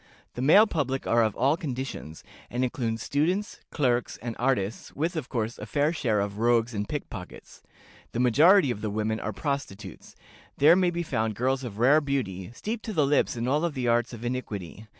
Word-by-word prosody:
The 120 - -5
male 180 +11 +7
public 135 - -2
are 115 - +3
of 110 -2 0
all 135 +5 +2
conditions, 130 - -6 0.3
and 125 +1 -1
include 120 -3 -2
students, 180 - -1
clerks, 125 -5 0
and 115 -1 -5
artists, 115 -5 -1
with, 165 +5 -1
of 150 -5 -4
course, 115 -1 -3
a 105 - -7
fair 145 +7 +1
share 110 -10 0
of 100 +1 -4
rogues 120 0 +2
and 105 -1 -3
pickpockets. 95 -11 -7 0.5
The 120 - -3
majority 145 - +5
of 105 - -5
the 110 - -2
women 110 +1 -1
are 110 - -3
prostitutes: 135 -5 -5 0.4
there 155 +4 +7
may 185 -1 +3
be 170 0 -2
found 110 -8 -1
girls 130 +4 0
of 110 -5 -7
rare 135 +7 +5
beauty, 105 -11 -3
steeped 215 - -5
to 220 - -4
the 155 -6 +3
lips 145 -2 +2
in 120 +1 -2
all 150 +6 +1
the 130 -5 -3
arts 120 0 +2
of 120 -1 -8
iniquity. 110 -5 -5
125 Hz, 190 wpm, -27 LUFS, 110-150 Hz, 0.5 s, male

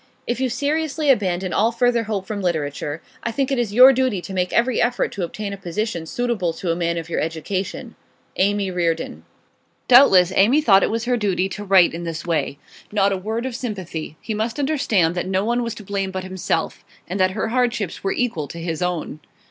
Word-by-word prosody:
If 240 - -2
you 260 -1 0
seriously 300 +2 0
abandon 185 -6 0
all 225 +3 +3
further 235 -1 +1
hope 205 -3 -3
from 205 0 -4
literature, 155 -3 -2 0.2
I 230 - -2
think 270 +3 -1
it 270 - +1
is 235 -4 -1
your 255 +5 +8
duty 255 -6 +1
to 190 - -8
make 180 -1 -1
every 240 0 +2
effort 245 0 +1
to 195 - -4
obtain 200 +4 -4
a - - -6
position 180 -2 -3
suitable 225 -6 -1
to 170 +1 -2
a - - 0
man 170 0 -1
of 165 -1 -5
your 170 - -2
education. 165 +5 -4 0.5
AMY 200 0 +1
REARDON.' 165 - -2 0.7
Doubtless 195 -9 +7
Amy 235 +10 +5
thought 200 -10 +5
it - - +1
was 230 +1 -2
her 245 0 +1
duty 190 -4 0
to 205 - -6
write 190 -4 +5
in 170 +1 -5
this 165 -1 -5
way. 165 -4 -1 0.3
Not 200 -1 +2
a - - 0
word 220 +6 -3
of 260 -3 -4
sympathy; 185 - -5
he 220 - -4
must 220 +4 -2
understand 270 - +1
that 175 0 -3
no 190 +1 0
one 240 +2 +1
was 235 -1 -3
to 210 - -10
blame 195 -1 -2
but 190 0 -4
himself; 185 -3 -3 0.2
and 185 +3 -4
that 185 +2 +2
her 220 - -1
hardships 235 -6 -1
were 195 - 0
equal 220 -12 -1
to 170 - -9
his 165 0 -4
own. 180 -4 -2
195 Hz, 210 wpm, -21 LUFS, 175-235 Hz, 0.7 s, your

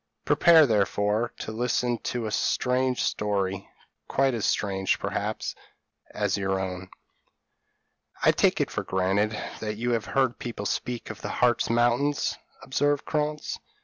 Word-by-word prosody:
Prepare, 165 -2 +6
therefore, 105 0 +1
to - - -5
listen 120 +1 0
to 120 -2 -3
a 105 - -3
strange 125 +3 +1
story, 100 -2 -1 0.4
quite 135 -1 +2
as 115 -3 -1
strange, 95 -2 0
perhaps, - - -3 0.6
as 105 -2 -1
your 95 -1 0
own: 95 0 -5 1.3
"I - - +7
take - - +2
it - - 0
for - - -2
granted, 100 +3 0 0.2
that 105 -1 -4
you 120 +2 -1
have 115 -2 0
heard 130 -3 +1
people 115 -4 -5
speak 120 +3 -3
of 110 - -11
the - - -4
Hartz 120 -1 +2
Mountains," 120 +5 +2 0.3
observed 145 +2 0
Krantz. 150 -1 -2
115 Hz, 140 wpm, -26 LUFS, 100-125 Hz, 1.3 s, I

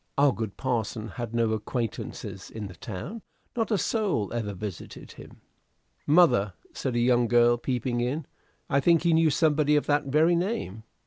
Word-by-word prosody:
Our 140 0 +5
good 110 -4 -5
parson 115 -3 -2
had 120 +2 -6
no 115 -1 +2
acquaintances 110 +1 -4
in 110 -2 -6
the 95 - -8
town. 105 - -7 0.3
Not 225 -2 0
a 215 - +2
soul 190 - -1
ever 105 -4 -3
visited 100 -2 -8
him." - - -14 0.7
"Mother," 145 - +4 0.2
said 130 -3 -3
a - - +2
young 120 0 +3
girl 120 0 +5
peeping 120 0 -2
in, 135 +5 -2 0.4
"I 140 - +2
think 165 +3 +3
he 170 -1 +3
knew 160 0 +4
somebody 150 0 +2
of 150 - +2
that 145 0 +1
very 155 +5 +3
name. 170 - -3
125 Hz, 170 wpm, -27 LUFS, 110-155 Hz, 0.7 s, Our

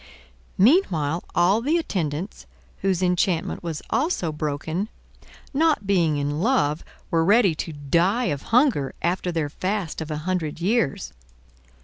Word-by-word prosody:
Meanwhile 180 - +3
all 185 +6 +3
the 300 +7 +2
attendants, 175 - -3 0.3
whose 190 -2 +1
enchantment 180 -1 0
was 165 -3 -5
also 265 - 0
broken, 155 +6 -3 0.6
not 300 -6 +2
being 170 -6 +2
in 145 +1 -2
love, 180 - +1 0.3
were 165 -1 +3
ready 200 0 +4
to 165 - -6
die 170 - +1
of 140 - -6
hunger 230 - +2
after 180 +1 0
their 160 -3 -1
fast 185 +2 -3
of 160 - -5
a 155 - -3
hundred 175 -5 -2
years. 170 - 0
175 Hz, 130 wpm, -24 LUFS, 155-210 Hz, 0.6 s, ready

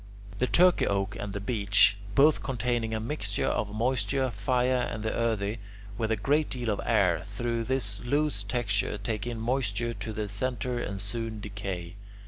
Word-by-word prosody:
The 125 - +2
Turkey 180 +4 +5
oak 100 0 0
and 100 - -4
the 100 - -3
beech, 100 -2 +4 0.2
both 150 +2 +5
containing 120 -3 -1
a - - -1
mixture 110 -4 -2
of 105 -1 0
moisture, 130 +3 0
fire, 125 +3 +1
and 110 - -4
the 110 - -1
earthy, 110 -2 0 0.4
with 110 +1 -1
a 110 - +3
great 145 +8 +1
deal 120 -4 -2
of 100 - -2
air, 90 -7 +3
through 115 +3 -2
this 110 -6 -1
loose 145 -2 +1
texture 105 -1 -1
take 105 +1 -3
in 120 -2 -3
moisture 120 -1 -1
to 115 - -5
their 105 0 -3
centre 120 +3 -2
and 100 -4 -3
soon 110 +1 -4
decay. 100 -3 -5
110 Hz, 170 wpm, -28 LUFS, 100-125 Hz, 0.4 s, Turkey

